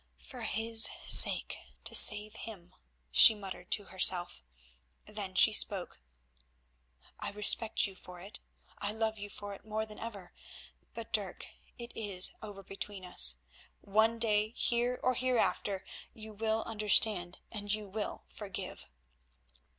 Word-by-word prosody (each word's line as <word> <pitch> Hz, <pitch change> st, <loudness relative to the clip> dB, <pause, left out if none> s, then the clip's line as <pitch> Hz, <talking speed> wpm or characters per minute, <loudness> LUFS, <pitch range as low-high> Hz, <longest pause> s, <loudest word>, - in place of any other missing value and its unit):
"For 65 Hz, +1 st, -12 dB
his 225 Hz, +1 st, +3 dB, 0.2 s
sake—to -, -, +3 dB
save 210 Hz, +1 st, +4 dB
him," 185 Hz, -6 st, -10 dB, 0.4 s
she 215 Hz, -, +8 dB
muttered 190 Hz, -3 st, -10 dB
to 205 Hz, -, +1 dB
herself—then 65 Hz, -, -3 dB
she 215 Hz, +3 st, +4 dB
spoke. 195 Hz, -, 0 dB, 1.2 s
"I -, -, -5 dB
respect 210 Hz, +2 st, +3 dB
you 195 Hz, -, -7 dB
for 180 Hz, -1 st, -14 dB
it, 195 Hz, +4 st, -9 dB, 0.4 s
I 205 Hz, +1 st, -3 dB
love 220 Hz, -1 st, -3 dB
you 205 Hz, 0 st, -8 dB
for 205 Hz, 0 st, -9 dB
it 195 Hz, -, -14 dB
more 220 Hz, 0 st, -4 dB
than 215 Hz, -1 st, -13 dB
ever; 205 Hz, -6 st, -9 dB, 0.6 s
but, 230 Hz, -1 st, -9 dB
Dirk, 200 Hz, -4 st, -3 dB, 0.3 s
it 235 Hz, 0 st, -10 dB
is 200 Hz, -4 st, 0 dB
over 205 Hz, -2 st, -10 dB
between 195 Hz, 0 st, -8 dB
us. 65 Hz, -, +5 dB, 0.5 s
One 220 Hz, +3 st, +1 dB
day, 215 Hz, -1 st, 0 dB
here 240 Hz, +1 st, 0 dB
or 255 Hz, -, +1 dB
hereafter, 235 Hz, -6 st, -1 dB, 0.3 s
you 220 Hz, -1 st, -11 dB
will 220 Hz, +1 st, -2 dB
understand 210 Hz, -4 st, +2 dB
and 205 Hz, -2 st, -4 dB
you 210 Hz, -1 st, -1 dB
will 210 Hz, +2 st, -6 dB
forgive." 200 Hz, -3 st, -8 dB
210 Hz, 130 wpm, -31 LUFS, 190-220 Hz, 1.2 s, she